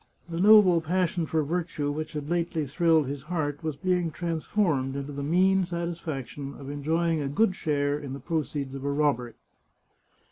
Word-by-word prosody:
The 170 -1 -4
noble 200 -5 +7
pas 180 +2 +1
sion 170 -3 -2
for 160 -1 +1
virtue 160 -2 -2
which 155 +1 -5
had 150 -1 -4
lately 170 -2 -1
thrilled 160 +1 +3
his 140 +1 -5
heart 150 -2 -3
was 155 -2 -2
being 180 +2 0
transformed 160 -3 -1
into 140 +1 -4
the 140 - -4
mean 185 +6 +3
satisfaction 160 -6 -5
of 140 0 -7
enjoying 160 +3 0
a 140 - -2
good 190 +6 +2
share 145 -3 0
in 140 -3 -6
the 140 - -6
proceeds 145 -5 -3
of 135 -1 -6
a 140 - 0
robbery. 140 -5 0
155 Hz, 175 wpm, -27 LUFS, 140-170 Hz, -, noble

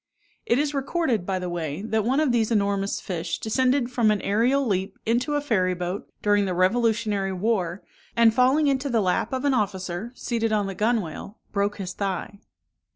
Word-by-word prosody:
It 235 - +3
is 290 +1 0
recorded, 275 - -1
by 190 -1 0
the 180 0 -4
way, 170 0 -4
that 220 -1 0
one 260 +6 +1
of 305 -4 +2
these 230 -2 +2
enormous 200 -2 0
fish 170 -2 -3
descended 255 +2 +1
from 235 -3 +2
an 210 -1 +2
aerial 245 +7 +2
leap 195 -3 -1
into 250 +6 +1
a 290 - +1
ferry 185 -10 +1
boat, 180 +2 -4
during 205 -1 +3
the 185 -2 -2
revolutionary 210 0 +1
war, 185 -2 -1 0.3
and 230 -1 +5
falling 260 +5 +4
into 275 0 +1
the 235 -3 +2
lap 190 +3 0
of 260 +1 -2
an 280 - +3
officer, 195 -1 -2
seated 230 -3 -1
on 210 -2 +1
the 195 - -4
gunwale, 210 -2 -2
broke 200 0 0
his 185 -3 -5
thigh. 200 +1 -4
215 Hz, 185 wpm, -25 LUFS, 190-245 Hz, 0.3 s, and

